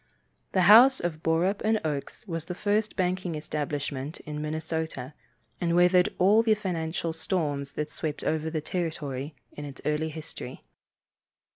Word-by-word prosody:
The 185 - +4
house 240 +8 +8
of 165 -2 -3
Borup 170 +5 +1 0.2
& 210 - -7
Oakes 150 +7 -4
was 165 -3 -3
the 180 - -5
first 210 +2 0
banking 180 -2 -1
establishment 145 -1 -3
in 150 0 -5
Minnesota, 155 -3 -3 0.5
and 170 -1 +1
weathered 180 +1 +5
all 205 +5 +5
the 225 -1 +3
financial 165 -4 -2
storms 150 -4 -2
that 150 0 -3
swept 155 -2 -4
over 160 0 0
the 155 -1 -2
territory 155 -4 -3 0.2
in 145 - -8
its 140 -2 -8
early 150 +1 0
history. 155 -5 -8
160 Hz, 145 wpm, -28 LUFS, 150-180 Hz, 0.5 s, house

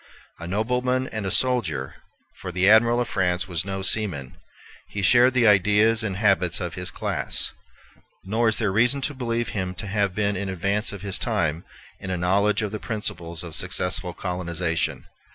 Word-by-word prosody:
A 85 - -7
nobleman 125 +6 0
and 110 -3 -4
a - - 0
soldier, 120 - +1 0.5
for 90 - -6
the 90 +2 +1
Admiral 115 +3 +5
of 120 - -1
France 90 -1 0
was 90 -2 -2
no 95 -1 -4
seaman, 90 -12 0 0.5
he 100 - -5
shared 125 +5 +5
the 125 -2 +4
ideas 105 +2 +4
and 100 -4 -3
habits 95 -4 +2
of 90 -2 -4
his 90 +2 -2
class; - - -1 0.7
nor 110 +4 +1
is 110 - +1
there 110 -5 0
reason 120 +7 +3
to 145 +2 0
believe 120 -3 -2
him 95 -2 -3
to 100 - -5
have 100 -2 -1
been 105 -1 0
in 100 0 -3
advance 100 +4 -1
of 100 -1 -9
his 100 -2 -2
time 85 - -1 0.3
in 95 - -7
a 90 - -1
knowledge 100 +5 +2
of 105 - -3
the 110 - -4
principles 85 -7 -5
of 85 -2 -8
successful 90 +3 -1
colonization. 85 -2 -2
100 Hz, 180 wpm, -24 LUFS, 90-110 Hz, 0.7 s, Admiral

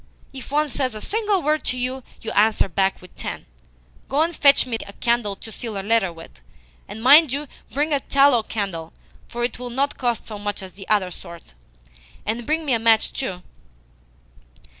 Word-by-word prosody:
If 265 -2 -9
one 300 +1 +2
says 260 -4 -1
a - - -5
single 415 - 0
word 305 +1 +1
to 255 - -1
you, 255 +1 -2 0.2
you 225 - -4
answer 215 0 +3
back 190 +1 0
with 180 - -15
ten. - - -6 0.6
Go 285 +4 +3
and 335 0 -2
fetch 280 -2 +6
me 240 -3 -2
a 200 - -10
candle 235 -4 0
to 220 - -11
seal 220 -2 -4
a 195 - -6
letter 220 -4 +2
with. 165 - -13 0.5
And 220 - -8
mind 290 +2 +8
you 285 +2 -2 0.2
bring 295 +3 +1
a 285 - +3
TALLOW 275 -3 +4
candle, 185 -7 -4 0.3
for 240 0 -4
it 240 0 -1
will 250 0 -5
not 275 +4 -1
cost 240 -3 -1
so 210 -2 -7
much 205 -1 -4
as 185 - -9
the 195 -1 -11
other 200 -4 +2
sort. 170 - -11 0.7
And 230 +2 -3
bring 315 +1 0
me 275 - +1
a 230 - +2
match 225 -1 +3
too." 185 -9 -4
235 Hz, 195 wpm, -22 LUFS, 205-275 Hz, 0.7 s, mind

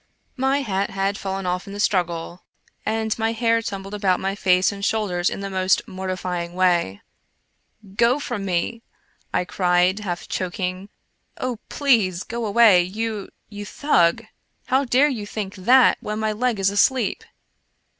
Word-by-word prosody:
IVIy 270 +1 +1
hat 195 -4 -1
had 195 +1 -1
fallen 195 -1 -4
off 180 +1 -2
in 200 - -8
the 205 - -7
struggle, 175 -3 -1 0.4
and 220 0 0
my 225 0 +1
hair 230 0 +2
tumbled 195 -2 -6
about 195 -3 +1
my 195 +1 -1
face 185 -2 +3
and 200 -1 -8
shoulders 195 -5 0
in - - -6
the 200 - -3
most 185 0 +1
mortifying 185 -2 -4
way. 175 - +1 0.4
" 200 -3 -23
Go 235 +1 +5
away 285 - -3
from 240 -7 -4
me," 195 +5 -2 0.5
I 180 - 0
cried, 180 +1 +2
half 180 -4 -5
choking. 185 +1 -3 0.2
" - - -46
Oh, 250 -3 -3
please 215 -11 +2
go 235 -1 -4
away, 205 -3 +6
you 210 +3 -4
— - - -47
you 205 - -5
Thug! 205 - +1 0.4
How 265 +2 +2
dare 260 +4 +4
you 225 -8 -4
think 205 -2 -5
that 245 +7 +4
when 210 0 -4
my 220 0 0
leg 235 +1 0
is 195 0 +2
asleep 230 +3 +1
200 Hz, 165 wpm, -22 LUFS, 185-225 Hz, 0.5 s, away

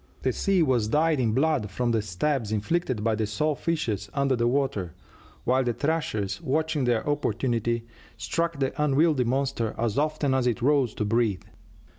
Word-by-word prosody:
The - - +1
sea 195 -4 +2
was 125 -7 +1
dyed 155 +4 +2
in 115 -4 +1
blood 140 -6 +1
from 120 +4 -1
the 115 -1 +1
stabs 110 +4 -1
inflicted 115 +2 -1
by 115 0 +2
the 110 0 -1
saw 150 +9 0
fishes 115 - -2
under 140 -1 +2
the 120 0 +1
water, 120 - -1 0.5
while 130 +2 +2
the 120 -1 0
thrashers, 110 -11 -1
watching 155 0 0
their 120 0 0
opportunity, 120 -5 0 0.3
struck 170 0 -1
at - - -10
the 135 +2 0
unwieldy 150 -2 +3
monster 130 -2 -1
as 115 +2 0
often 150 -2 0
as 130 -2 +1
it 120 0 -1
rose 140 -4 +2
to 105 - -1
breathe. 110 -2 +1
130 Hz, 175 wpm, -26 LUFS, 110-150 Hz, 0.5 s, unwieldy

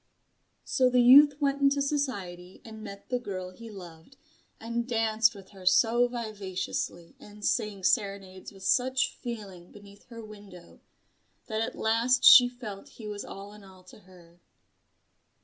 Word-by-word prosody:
So 255 -1 +2
the 250 -1 +3
youth 285 +3 +7
went 280 -1 -1
into 280 0 +3
society 200 -12 -4
and 220 -1 -11
met 200 -1 -11
the 250 -1 -1
girl 185 -6 -6
he 230 +5 -12
loved, 180 +3 -13 0.4
and 235 +1 -4
danced 225 -1 +1
with 195 -2 -14
her 195 -2 -14
so 230 +6 +3
vivaciously 195 -7 -5
and 210 0 -11
sang 210 -5 -1
serenades 195 -1 -2
with 195 -2 -15
such 260 +5 +1
feeling 200 -8 -8
beneath 200 0 -16
her 230 -2 -10
window, 205 -5 -14 0.7
that 220 -1 -3
at 225 - -3
last 235 +3 +1
she 245 -1 +9
felt 230 -6 -10
he 220 - -9
was 205 -1 -6
all 200 +1 -10
in 210 -1 -15
all 190 -1 -17
to 185 - -16
her. 175 -3 -20
215 Hz, 150 wpm, -28 LUFS, 190-245 Hz, 0.7 s, she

